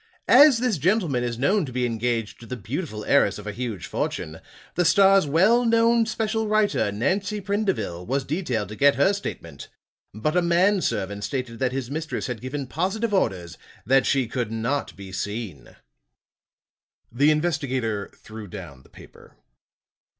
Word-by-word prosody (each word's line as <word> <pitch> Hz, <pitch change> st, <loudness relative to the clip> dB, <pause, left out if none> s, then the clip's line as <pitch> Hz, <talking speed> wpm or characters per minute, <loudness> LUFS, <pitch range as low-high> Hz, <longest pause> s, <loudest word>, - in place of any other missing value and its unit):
As 290 Hz, -4 st, +7 dB
this 230 Hz, -8 st, 0 dB
gentleman 170 Hz, -, +1 dB
is 120 Hz, -1 st, -3 dB
known 190 Hz, -, +2 dB
to 135 Hz, -, -6 dB
be 125 Hz, 0 st, -1 dB
engaged 115 Hz, -1 st, -2 dB
to 115 Hz, -, -12 dB
the 125 Hz, -, -4 dB
beautiful 110 Hz, -, -5 dB
heiress 120 Hz, -8 st, +3 dB
of 105 Hz, -, -10 dB
a 105 Hz, -, -3 dB
huge 115 Hz, -3 st, -5 dB
fortune, 80 Hz, +1 st, -4 dB, 0.3 s
the 180 Hz, -, +1 dB
Star's 195 Hz, -1 st, +5 dB
well 190 Hz, +12 st, +4 dB
known 230 Hz, 0 st, +3 dB
special 220 Hz, 0 st, -1 dB
writer, 210 Hz, -, +1 dB
Nancy 190 Hz, -, -1 dB
Prindeville, 190 Hz, -, -2 dB
was 135 Hz, +2 st, 0 dB
detailed 130 Hz, -, -2 dB
to 110 Hz, -, -7 dB
get 140 Hz, +4 st, +4 dB
her 195 Hz, -, +3 dB
statement. 200 Hz, 0 st, -7 dB, 0.4 s
But 130 Hz, -, -2 dB
a 180 Hz, -, +4 dB
man 180 Hz, +3 st, +3 dB
servant 100 Hz, -, -2 dB
stated 125 Hz, -3 st, -4 dB
that 130 Hz, -1 st, 0 dB
his 130 Hz, -1 st, -4 dB
mistress 155 Hz, +1 st, -3 dB
had 125 Hz, -4 st, -5 dB
given 135 Hz, +2 st, -4 dB
positive 190 Hz, -, -2 dB
orders 90 Hz, -, -1 dB, 0.3 s
that 135 Hz, -1 st, +3 dB
she 135 Hz, -2 st, +2 dB
could 115 Hz, -1 st, -3 dB
not 115 Hz, +6 st, -2 dB
be 95 Hz, -1 st, -10 dB
seen." 100 Hz, -, -6 dB, 1.4 s
The 140 Hz, +5 st, +3 dB
investigator 135 Hz, -10 st, -1 dB
threw 110 Hz, -1 st, -10 dB
down 80 Hz, -8 st, -10 dB
the -, -, -22 dB
paper. -, -, -16 dB
135 Hz, 160 wpm, -24 LUFS, -, 1.4 s, As